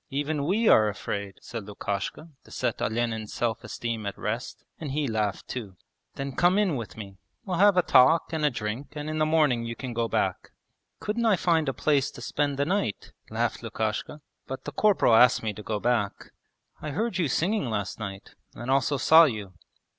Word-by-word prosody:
Even 145 +1 -1
we 215 +5 +2
are 110 -1 +6
afraid,' 100 -1 -5
said 115 -4 -6
Lukashka 100 - -4
to - - -19
set 120 -3 -2
Olenin's 110 -1 -1
self 115 -2 -1
esteem 115 -3 -4
at 100 - -5
rest, 115 +4 -4 0.2
and 145 -4 -5
he 150 -1 0
laughed 110 -3 -2
too. 105 -7 -6 0.4
'Then 140 0 -4
come 180 +2 +4
in 200 -7 +2
with 115 -4 -6
me. 100 -3 -9 0.3
We'll 180 -3 -2
have 200 -1 +6
a 180 - +5
talk 160 +6 +5
and 160 -1 -1
a 150 - +5
drink 115 +3 -5
and 150 0 -5
in 155 0 -2
the 155 - +3
morning 150 -7 +3
you 115 0 -4
can 125 -1 -6
go 115 0 0
back.' - - -1 0.5
'Couldn't 230 +2 -1
I 215 - +5
find 165 -4 +1
a - - +1
place 140 0 +1
to - - -10
spend 145 +1 -1
the 140 - +1
night?' 160 - -2 0.2
laughed - - -1
Lukashka. 110 +7 -3 0.3
'But 130 - -6
the - - -5
corporal 205 - +3
asked 120 +1 +6
me 110 -1 -1
to 105 - -9
go 105 0 -3
back.' 115 -3 -1 0.5
'I 155 - -4
heard 200 +7 -2
you 170 - +2
singing 170 - 0
last 105 -1 -3
night, 100 -2 -7 0.2
and 120 +2 -4
also 135 +1 +2
saw 160 +5 +7
you.' 105 -8 -4
130 Hz, 200 wpm, -27 LUFS, 110-155 Hz, 0.5 s, saw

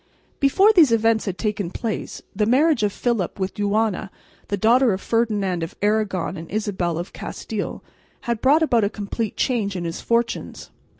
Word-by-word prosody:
Before 385 +10 +5
these 325 - +6
events 225 -1 +2
had 190 -3 -3
taken 210 -4 -2
place, 220 +3 -5
the 210 +1 +1
marriage 280 +2 +3
of 210 -1 +1
Philip 220 -5 -2
with 190 0 -2
Juana, 205 -1 0 0.4
the 200 - -1
daughter 235 +3 +4
of 190 - -3
Ferdinand 205 -6 0
of 165 - -5
Aragon 205 -4 0
and 165 0 -9
Isabel 190 -6 -2
of 175 +3 -6
Castile, 215 -2 -5 0.4
had 235 -2 -2
brought 295 +5 +4
about 235 -8 +3
a 200 - +2
complete 210 +1 -4
change 215 -6 0
in 180 - -3
his 165 0 -4
fortunes. 235 0 -2
215 Hz, 170 wpm, -22 LUFS, 195-235 Hz, 0.4 s, these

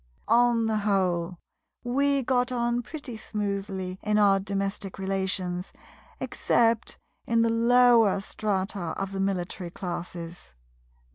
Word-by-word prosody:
On 235 0 +4
the 220 -1 +1
whole 185 -4 0 0.5
we 275 +2 +1
got 250 0 +1
on 240 0 0
pretty 255 +1 -7
smoothly 195 -3 -4
in 210 0 +1
our 200 -2 +5
domestic 195 0 -3
relations, 190 -2 -2 0.5
except 230 -1 +1 0.3
in 230 0 +3
the 230 - +2
lower 235 -3 +5
strata 195 -3 -2
of 195 0 -3
the 195 - -4
Military 185 -2 -2
Classes. 175 - -7
200 Hz, 115 wpm, -27 LUFS, 190-230 Hz, 0.5 s, our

